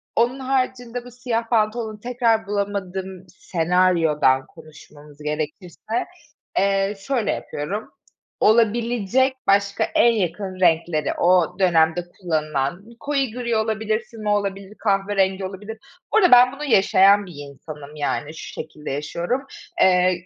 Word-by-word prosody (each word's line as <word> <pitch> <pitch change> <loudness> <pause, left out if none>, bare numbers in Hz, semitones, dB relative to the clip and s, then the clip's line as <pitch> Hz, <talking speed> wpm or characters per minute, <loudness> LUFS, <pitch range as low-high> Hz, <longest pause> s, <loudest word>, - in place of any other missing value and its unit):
Onun 245 +3 +1
haricinde 255 -2 -2
bu 245 - -11
siyah 235 -2 -3
pantolonu 215 -1 0
tekrar 230 -2 0
bulamadığım 190 -2 -4
senaryodan 165 -6 +2
konuşmamız 150 -2 -16
gerekirse, 160 +9 -4 0.5
eee, 195 +1 +1
şöyle 240 0 -1
yapıyorum, 195 +9 -5 0.5
olabilecek 235 +3 +2
başka 200 0 +2
en 235 - +3
yakın 190 -1 -3
renkleri, 165 -3 +2
o 180 0 +2
dönemde 170 -2 +3 0.2
kullanılan, 155 0 -2
koyu 275 -4 -1
gri 235 0 -2
olabilir, 220 0 0
füme 215 -2 -5
olabilir, 200 0 -2
kahverengi 195 -2 +1
olabilir. 205 +4 -7 0.4
Bu - - +5
arada 370 -5 +5
ben 250 0 +8
bunu 275 +2 -8
yaşayan 200 -4 +5
bir 180 - -11 0.2
insanım, 150 +1 -11
yani, 150 0 -2
şu 160 - -9
şekilde 150 -2 -7
yaşıyorum. 170 - -2 0.4
Eee, 180 -1 +3
195 Hz, 120 wpm, -22 LUFS, 175-230 Hz, 0.5 s, ben